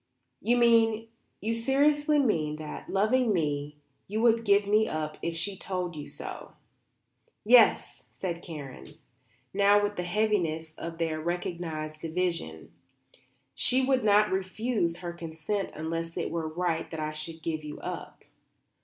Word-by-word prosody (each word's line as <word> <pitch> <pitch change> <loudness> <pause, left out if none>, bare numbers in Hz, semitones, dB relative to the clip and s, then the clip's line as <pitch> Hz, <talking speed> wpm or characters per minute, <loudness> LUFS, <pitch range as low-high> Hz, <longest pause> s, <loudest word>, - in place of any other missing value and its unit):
"You 240 +4 +2
mean, 225 -1 +4 0.3
you 225 +2 0
seriously 290 +5 +3
mean, 165 - +1
that, 155 -1 -8
loving 220 +4 +2
me, 150 -5 -1 0.3
you 210 +3 -2
would 230 -1 +4
give 200 0 +4
me 215 +2 +3
up 155 -1 -3
if 170 0 -2
she 195 +4 -1
told 180 -2 -3
you 145 -1 -7
to?" - - -8 0.9
"Yes," 240 +1 +5
said 170 -3 -4
Karen, 145 -7 -8 0.7
now 200 +1 +5
with 205 0 -1
the - - 0
heaviness 175 -5 0
of 165 0 -6
their 160 -2 -1
recognized 165 -2 -3
division. 165 - -3 0.8
"She 260 +1 +2
would 260 -2 +2
not 210 0 +4
refuse 190 -1 -1
her 175 -1 -5
consent 170 +4 -3
unless 165 +2 -4
it 170 - -2
were 165 -1 -2
right 165 -1 -1
that 160 - -6
I 155 0 -2
should 160 +1 -7
give 155 -2 -2
you 150 0 -7
up." - - -7
175 Hz, 145 wpm, -28 LUFS, 160-215 Hz, 0.9 s, Yes